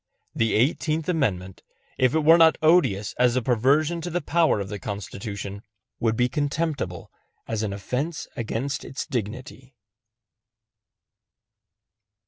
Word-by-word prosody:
The 115 -1 +1
Eighteenth 155 +6 +1
Amendment, 100 - -1 0.4
if 130 +2 +3
it 160 - +3
were 165 +3 +6
not 160 -1 +6
odious 155 - +3
as 125 -1 +4
a 130 - +2
perversion 140 +8 +2
of 170 0 -5
the 175 - +1
power 165 -5 +2
of 100 - -4
the 105 +1 -6
Constitution, 100 0 -6 0.4
would 115 -1 +1
be 125 - +3
contemptible 145 - -2 0.4
as 110 -1 -2
an 105 -2 -2
offense 125 - -3
against 125 +4 -3
its 135 - -5
dignity. 125 +2 -6
125 Hz, 125 wpm, -25 LUFS, 105-155 Hz, 0.4 s, were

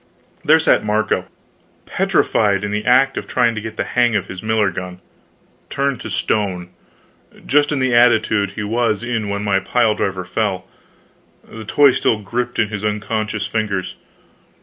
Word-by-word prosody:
There 155 +2 +5
sat 160 - +2
Marco, 105 0 0 0.6
petrified 100 -2 +1
in 105 - -3
the 105 0 -2
act 135 +2 +3
of - - -4
trying 115 - +1
to 110 - -5
get 110 0 -8
the - - 0
hang 120 -2 +1
of 100 -2 0
his 95 -1 -8
miller 110 -2 +1
gun 90 0 -7 0.7
turned 140 -3 -1
to - - -6
stone, 95 -4 -1 0.8
just 145 +1 +2
in 145 - 0
the 130 -2 0
attitude 110 -4 +3
he 105 - -4
was 110 0 0
in 115 -4 -2
when 100 0 -3
my 100 -2 +1
pile 115 +3 +1
driver 95 -3 -3
fell, 95 0 -2 0.8
the 110 -1 -10
toy 140 +5 +5
still 115 - +1
gripped 120 +4 -4
in 110 -2 +1
his 105 -1 -5
unconscious 105 0 -2
fingers. 105 -4 -2
110 Hz, 165 wpm, -19 LUFS, 100-120 Hz, 0.8 s, There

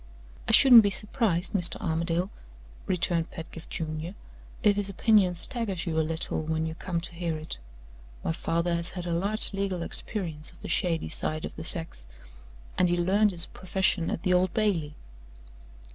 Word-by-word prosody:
"I - - +2
shouldn't 245 0 +9
be 205 - +2
surprised, 200 -3 +1
Mr. 180 -4 +1
Armadale," 170 +3 -1 0.6
returned 170 -2 +1
Pedgift 165 -1 -9
Junior, 160 +3 -4 0.5
"if 210 -1 +5
his 200 -1 0
opinion 195 -2 +3
staggers 200 -1 -3
you 160 -2 0
a - - +4
little, 160 0 -1
when 160 0 -1
you 160 - -3
come 170 +1 -3
to 175 - -6
hear 170 -2 -3
it. 155 - -7 0.6
My - - 0
father 170 +1 -1
has 170 +1 +1
had 180 -2 -6
a 170 - -2
large 200 +6 0
legal 195 -3 -2
experience 165 -6 -3
of - - -15
the - - -7
shady 165 -3 +1
side 155 0 -3
of - - -8
the 160 - -7
sex, 160 - -3 0.7
and 180 -1 +4
he 175 - +1
learned 195 +5 +3
his 175 -4 +1
profession 185 -2 0
at - - -3
the 185 - +2
Old 180 0 +3
Bailey." 175 -9 0
175 Hz, 175 wpm, -27 LUFS, 165-195 Hz, 0.7 s, shouldn't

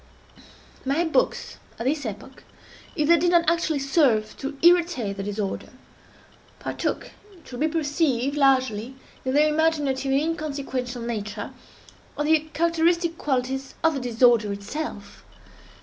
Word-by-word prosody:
My 280 +6 +1
books, 420 +10 0 0.2
at 230 - -5
this 285 -1 0
epoch, 220 +6 -9 0.5
if 300 -4 +1
they 340 +1 +6
did 350 +3 +2
not 345 -1 +3
actually 335 -2 +1
serve 270 -6 +2
to 275 +1 -5
irritate 340 - +3
the 195 - -5
disorder, 205 0 -4 0.9
partook, - - -3 0.2
it 350 -8 -17
will 245 - -7
be 310 - +2
perceived, 290 -4 0
largely, 260 -4 +2 0.3
in 260 +1 -1
their 300 +1 +5
imaginative 295 -4 +1
and 270 - +4
inconsequential 280 -6 -3
nature, 215 -3 -4 0.7
of 295 - 0
the 315 +1 +5
characteristic 335 +1 +1
qualities 265 -1 -2
of 325 0 +4
the 275 - -2
disorder 235 -3 +3
itself. 200 0 -6
275 Hz, 135 wpm, -24 LUFS, 245-320 Hz, 0.9 s, they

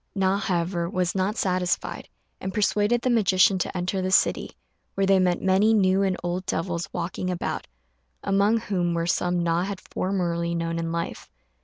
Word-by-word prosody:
Na, 195 0 +2
however, 175 -2 -1
was 180 -1 -1
not 195 +3 -1
satisfied, 180 -1 -1 0.3
and 190 0 -5
persuaded 210 +3 +2
the 255 - +1
magician 190 -4 +4
to 180 - -2
enter 185 +2 -1
the 185 - -1
city, 190 - +2 0.5
where 195 - +1
they 195 0 +4
met 180 -1 +1
many 195 +4 +4
new 190 -1 +3
and 190 -2 +1
old 175 +1 -2
devils 170 0 -2
walking 180 +1 -3
about, 180 -1 -3 0.6
among 200 +3 +3
whom 175 -5 -1
were 165 0 0
some 175 0 0
Na 170 0 +1
had 195 0 -4
formerly 170 -3 -2
known 165 0 -2
in 165 0 -3
life. 170 0 -4
185 Hz, 170 wpm, -25 LUFS, 175-195 Hz, 0.6 s, magician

